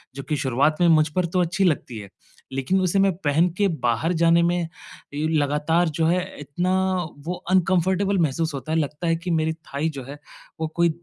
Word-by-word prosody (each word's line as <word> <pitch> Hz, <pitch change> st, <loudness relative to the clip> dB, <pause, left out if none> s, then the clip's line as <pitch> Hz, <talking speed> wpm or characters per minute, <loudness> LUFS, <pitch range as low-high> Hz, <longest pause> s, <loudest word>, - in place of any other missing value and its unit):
जो 135 Hz, -, -6 dB
कि 150 Hz, -, +1 dB
शुरुआत 140 Hz, +3 st, +1 dB
में 175 Hz, -, +5 dB
मुझ 155 Hz, -1 st, +5 dB
पर 180 Hz, -1 st, +2 dB
तो 180 Hz, -, +3 dB
अच्छी 175 Hz, +3 st, 0 dB
लगती 140 Hz, -8 st, -1 dB
है। 100 Hz, -2 st, -10 dB, 0.4 s
लेकिन 135 Hz, +9 st, 0 dB
उसे 185 Hz, +2 st, +1 dB
मैं 195 Hz, 0 st, +4 dB
पहन 160 Hz, +5 st, +3 dB
के 205 Hz, -1 st, +3 dB, 0.2 s
बाहर 125 Hz, +9 st, +1 dB
जाने 170 Hz, 0 st, +5 dB
में 175 Hz, +1 st, +2 dB, 0.6 s
ये 150 Hz, +2 st, -1 dB
लगातार 150 Hz, +4 st, +1 dB
जो 160 Hz, -, +3 dB
है 180 Hz, +2 st, +2 dB, 0.2 s
इतना 175 Hz, +6 st, -2 dB, 0.5 s
वो 180 Hz, -, -2 dB, 0.2 s
अनकम्फर्टेबल 190 Hz, +2 st, +2 dB
महसूस 160 Hz, 0 st, 0 dB
होता 140 Hz, +3 st, -5 dB
है। 160 Hz, -, +2 dB
लगता 150 Hz, +3 st, -3 dB
है 165 Hz, -, +3 dB
कि 170 Hz, +1 st, -4 dB
मेरी 160 Hz, 0 st, +1 dB
थाई 160 Hz, -1 st, -4 dB
जो 140 Hz, -4 st, -7 dB
है 145 Hz, +1 st, -8 dB, 0.4 s
वो 160 Hz, -, -1 dB
कोई 170 Hz, 0 st, +3 dB
160 Hz, 200 wpm, -23 LUFS, 145-180 Hz, 0.6 s, में